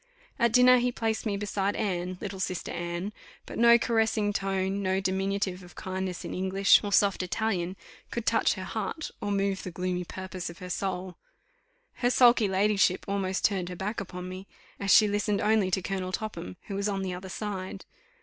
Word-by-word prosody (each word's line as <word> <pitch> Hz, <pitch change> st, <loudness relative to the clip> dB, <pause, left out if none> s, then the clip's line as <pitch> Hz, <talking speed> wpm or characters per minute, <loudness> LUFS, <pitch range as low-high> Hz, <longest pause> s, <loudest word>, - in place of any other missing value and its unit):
At 235 Hz, -1 st, +3 dB
dinner 250 Hz, 0 st, +7 dB
he 245 Hz, +1 st, +1 dB
placed 225 Hz, -1 st, -2 dB
me 200 Hz, -1 st, -1 dB
beside 200 Hz, 0 st, -1 dB
Anne, 185 Hz, -2 st, -2 dB
little 195 Hz, -2 st, -5 dB
sister 185 Hz, -2 st, -3 dB
Anne; 175 Hz, +4 st, -4 dB, 0.3 s
but -, -, -7 dB
no 235 Hz, 0 st, +8 dB
caressing 225 Hz, -3 st, +1 dB
tone, 195 Hz, 0 st, -1 dB
no 190 Hz, 0 st, +1 dB
diminutive 190 Hz, 0 st, -1 dB
of 175 Hz, -2 st, -14 dB
kindness 185 Hz, -1 st, -4 dB
in -, -, -5 dB
English, 190 Hz, +1 st, +4 dB
or 205 Hz, -, -3 dB
soft 200 Hz, -1 st, +3 dB
Italian, 185 Hz, -2 st, -1 dB, 0.3 s
could -, -, -4 dB
touch -, -, +3 dB
her -, -, -6 dB
heart, 315 Hz, -, -4 dB
or 205 Hz, -, -2 dB
move 195 Hz, -1 st, 0 dB
the -, -, -6 dB
gloomy 180 Hz, 0 st, -2 dB
purpose 185 Hz, 0 st, -6 dB
of 170 Hz, -, -10 dB
her 180 Hz, -1 st, -7 dB
soul. 185 Hz, 0 st, -3 dB, 0.8 s
Her 245 Hz, -, +2 dB
sulky 245 Hz, -3 st, +5 dB
ladyship 195 Hz, -1 st, +2 dB
almost 195 Hz, -1 st, -1 dB
turned 185 Hz, -4 st, +1 dB
her 180 Hz, -, -5 dB
back 205 Hz, +4 st, -3 dB
upon 180 Hz, -1 st, -7 dB
me, 185 Hz, +1 st, -8 dB, 0.3 s
as 200 Hz, 0 st, 0 dB
she 215 Hz, -, +8 dB
listened 205 Hz, 0 st, 0 dB
only 215 Hz, -3 st, +3 dB
to 185 Hz, 0 st, 0 dB
Colonel 185 Hz, -1 st, -3 dB
Topham, 185 Hz, -, -5 dB
who -, -, -6 dB
was 200 Hz, +1 st, -1 dB
on 195 Hz, -1 st, -2 dB
the 185 Hz, -1 st, -2 dB
other 185 Hz, +1 st, -7 dB
side. 190 Hz, -1 st, -5 dB
195 Hz, 190 wpm, -28 LUFS, 185-210 Hz, 0.8 s, no